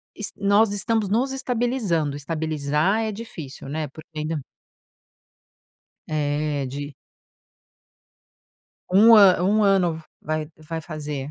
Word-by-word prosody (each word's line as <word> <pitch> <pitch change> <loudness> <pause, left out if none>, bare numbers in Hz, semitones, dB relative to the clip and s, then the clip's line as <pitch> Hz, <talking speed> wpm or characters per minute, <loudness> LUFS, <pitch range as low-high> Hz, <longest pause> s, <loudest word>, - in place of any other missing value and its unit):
es 210 - -4
nós 200 +1 +3
estamos 215 +1 0
nos 250 +6 +1
estabilizando. 235 - -1
Estabilizar 155 +5 0
é 220 - -2
difícil, 165 - -8
né, 155 0 -3
porque 155 +3 -13
ainda 155 0 -2 1.7
É, 145 -2 -1
de 145 +1 -6 2.0
Um 220 +5 +7
a 185 -4 +7
1 210 +3 +3
ano 185 -4 +3
v-vai 155 -1 -5
que 155 -1 -22
vai 160 +1 -5
fazer. 150 -3 -5
160 Hz, 110 wpm, -23 LUFS, 150-205 Hz, 2.0 s, Um